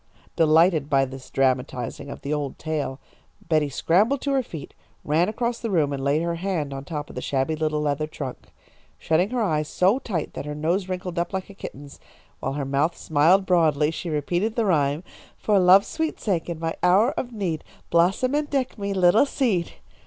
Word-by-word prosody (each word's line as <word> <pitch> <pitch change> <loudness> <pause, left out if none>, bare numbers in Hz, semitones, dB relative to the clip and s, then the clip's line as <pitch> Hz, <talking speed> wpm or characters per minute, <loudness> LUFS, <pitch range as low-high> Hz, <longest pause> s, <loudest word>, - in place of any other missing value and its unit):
Delighted 160 -2 +4
by 135 -2 +3
this 130 0 -10
dramatising 130 0 -1
of - - -8
the 140 - -3
old 145 -3 -3
tale, 150 -4 -3 0.5
Betty 155 -3 +2
scrambled 205 - +2
to 280 - -1
her 270 - +3
feet, 160 - -9 0.3
ran 160 +6 +2
across 235 +2 -2
the 230 - -3
room, 155 -7 +1
and 135 -1 -4
laid 145 +4 +1
her 170 0 -2
hand 165 -6 -2
on 135 0 -6
top 150 -1 -5
of - - -14
the - - -4
shabby 135 +3 0
little 155 -1 -1
leather 150 +1 -1
trunk. 130 -4 -7 0.5
Shutting 170 +5 +1
her 245 -1 0
eyes 155 -6 0
so 190 - +2
tight 180 - -4
that - - -6
her 150 - -4
nose 175 +5 -1
wrinkled 180 -1 -3
up 175 +1 -2
like 190 +1 -4
a - - -12
kitten's, 145 -7 -10 0.4
while 135 - -3
her 140 -1 -3
mouth 140 +5 0
smiled 165 +6 +3
broadly, 155 -4 +3
she 170 +1 -5
repeated 175 +9 -1
the 230 - +1
rhyme: 150 -3 +1 0.3
"For 210 -2 +2
love's 185 +2 +6
sweet 320 0 -3
sake, 180 -5 -1
in 170 - -3
my 165 0 -2
hour 195 +8 +4
of 245 - -4
need, 185 -8 -3 0.3
Blossom 190 +10 +2
and 295 0 0
deck 265 -5 -2
me, 200 0 -2
little 185 +8 +5
seed!" 215 - 0
165 Hz, 195 wpm, -24 LUFS, 150-195 Hz, 0.5 s, love's